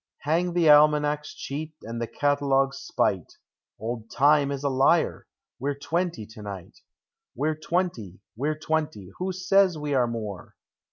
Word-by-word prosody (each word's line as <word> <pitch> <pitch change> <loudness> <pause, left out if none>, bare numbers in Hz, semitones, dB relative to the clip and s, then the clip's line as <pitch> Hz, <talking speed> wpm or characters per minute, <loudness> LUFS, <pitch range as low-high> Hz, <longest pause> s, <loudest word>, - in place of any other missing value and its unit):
Hang 170 +4 0
the 170 -2 +3
Almanac's 150 0 +4
cheat 155 +3 -6
and 115 +1 -5
the 115 - -2
Catalogue's 140 -1 +1
spite! - - -1 0.4
Old 115 +1 -5
Time 145 0 +3
is 140 0 -4
a 140 - +1
liar! 135 +5 +2 0.3
We 140 - -2
're 145 - -1
twenty 165 -4 -2
to 110 0 -13
night! 100 -4 -8 0.6
We're 150 +5 0
twenty! 155 - -2 0.2
We're 150 +6 -1
twenty! 155 - -2
Who 185 +1 -1
says 185 -1 +3
we 150 -1 -3
are 125 -3 +3
more? 110 -6 -6
145 Hz, 150 wpm, -26 LUFS, 120-155 Hz, 0.6 s, Almanac's